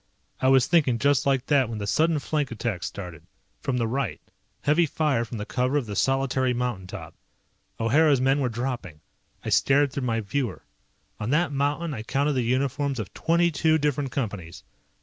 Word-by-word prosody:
I 130 - +3
was 130 -1 +5
thinking 150 -8 +3
just 140 +2 +2
like 135 -2 +2
that 135 -5 +3
when 115 - -4
the 105 - -4
sudden 160 +9 +2
flank 145 -1 -1
attack 115 -5 -3
started. 90 -5 -6 0.4
From 130 -2 -2
the 115 - +1
right. 135 +4 -2 0.4
Heavy 160 +3 +3
fire 145 -5 +1
from 115 0 -6
the 105 - -4
cover 130 +5 0
of 140 - -1
the 105 -2 -6
solitary 135 -1 +1
mountain 120 -7 -2
top. - - -8 0.7
O'Hara's 140 +5 +4
men 135 +2 +2
were 130 -3 +1
dropping. 120 - -4 0.4
I - - -2
stared 140 0 +3
through 130 -3 -2
my 115 -1 0
viewer. 115 0 -3 0.6
On 105 - -3
that 150 +2 +2
mountain 145 +3 -1
I 115 - -5
counted 140 +6 0
the 130 - +1
uniforms 135 +3 0
of 105 - -6
twenty 170 +1 +2
two 160 +1 +2
different 145 -3 -1
Companies. 105 -11 -4
135 Hz, 185 wpm, -25 LUFS, 115-145 Hz, 0.7 s, was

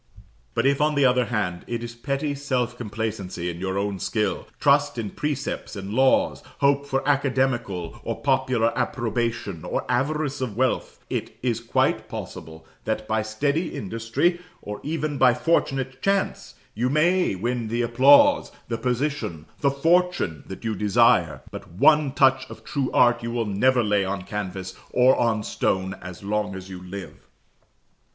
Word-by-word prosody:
But - - +1
if, 140 +1 +3
on 150 0 +2
the 140 -1 +4
other 125 -1 +3
hand, 100 -7 -2
it 120 0 -3
is 120 0 -6
petty 140 +4 -2
self 130 -4 -1
complacency 105 -6 -4
in 85 - -9
your 95 +1 -2
own 100 -1 -2
skill, 105 +1 -1
trust 145 -1 +3
in 110 -3 -3
precepts 145 -5 -3
and 100 0 -6
laws, 130 +2 +3 0.2
hope 140 0 +2
for 135 0 -1
academical 130 - 0
or - - -4
popular 115 -2 +1
approbation, 115 -7 -2
or - - -2
avarice 145 +2 -1
of 115 -5 -3
wealth, 130 0 -1
it - - -4
is 120 -3 0
quite 115 - 0
possible 80 0 -8 0.2
that 110 0 -2
by 110 0 +1
steady 140 +10 -1
industry, 115 - -1 0.2
or 105 0 -6
even 155 -2 -3
by 125 - +5
fortunate 135 -3 0
chance, 195 0 -1 0.2
you 120 +4 0
may 170 - +2
win 120 +4 -2
the 120 +2 -1
applause, 140 - +5 0.2
the 115 -1 -2
position, 125 - -2
the 140 - +3
fortune, 165 - +1
that 95 - -8
you 110 - 0
desire; 105 -1 +3
but - - -9
one 150 - +4
touch 130 -1 +3
of - - -11
true 140 -3 -2
art 120 -1 +4
you 115 - -4
will 115 -1 -1
never 120 +5 +2
lay 105 -2 +2
on 95 0 -3
canvas 95 -2 -5
or 125 +1 +5
on 115 -3 +1
stone 95 -1 -1
as 90 +1 -9
long 105 0 -1
as 95 0 -9
you 90 -1 -8
live. 95 +1 -9
120 Hz, 160 wpm, -24 LUFS, 105-140 Hz, 0.2 s, by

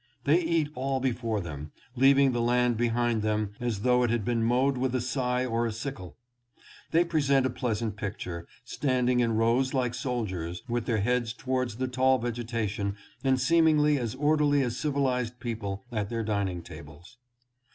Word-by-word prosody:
They 155 +5 +4
eat 165 -3 0
all 135 -1 -1
before 115 -4 -1
them, 75 -3 -7 0.2
leaving 135 +1 +5
the 120 -1 -1
land 120 0 +2
behind 120 0 +1
them 105 -1 0
as 120 -5 -2
though 125 +1 +3
it 120 - +2
had 115 -3 0
been 120 -1 0
mowed 130 +4 +2
with 130 0 -1
a - - +2
scythe 125 0 -1
or 115 0 0
a - - -2
sickle. 110 -5 -7 0.7
They 170 +2 +3
present 140 -5 +2
a 130 - 0
pleasant 115 -4 -2
picture, 90 -5 -5 0.2
standing 125 -3 +1
in 115 -2 +2
rows 120 +5 +2
like 125 -2 0
soldiers, 95 -9 -3
with 120 -1 -2
their 110 -4 +1
heads 120 +1 0
towards 130 -2 -2
the 130 +2 -2
tall 130 +1 +3
vegetation 115 -4 -3 0.3
and 130 -1 +2
seemingly 155 -2 +4
as 115 -3 -3
orderly 145 -1 +3
as 120 -2 -2
civilized 130 -4 -1
people 105 -5 -4
at 105 -3 -2
their 115 -1 -2
dining 100 -5 -2
tables. 85 +12 -13
120 Hz, 170 wpm, -28 LUFS, 110-130 Hz, 0.7 s, leaving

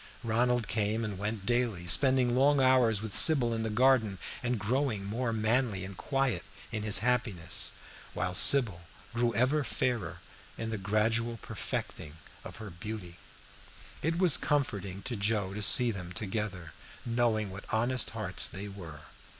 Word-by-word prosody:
Ronald 120 +1 0
came 110 +1 -1
and 100 -3 -6
went 105 -1 -4
daily, 120 -6 -1
spending 130 - +4
long 140 +2 +3
hours 125 -5 +3
with 110 -3 -4
Sybil 130 -7 +6
in 115 - -2
the 110 - -2
garden, 115 -3 +2 0.2
and 125 0 -2
growing 110 0 -2
more 115 +4 -3
manly 110 -3 0
and 95 0 -9
quiet 135 +4 -2 0.3
in 110 -2 -3
his 105 -1 +3
happiness, 115 -9 -1 0.4
while 90 0 -2
Sybil 105 -4 +6 0.3
grew 120 0 0
ever 130 +6 +1
fairer 105 -6 -2 0.4
in 115 0 -5
the 110 - -4
gradual 115 +4 -1
perfecting 75 0 -6 0.3
of - - -10
her 110 -2 -9
beauty. 90 -1 -8 0.8
It 165 +3 -1
was 175 -5 +6
comforting 100 -10 -2
to 125 - -4
Joe 100 -2 -1
to 105 - -5
see 120 +3 +5
them 90 -4 -8
together, 95 -5 -5 0.3
knowing 115 -4 -1
what 95 +2 -10
honest 120 +3 0
hearts 110 -4 0
they 100 +2 -7
were. 85 -7 -10
110 Hz, 150 wpm, -29 LUFS, 100-125 Hz, 0.8 s, Sybil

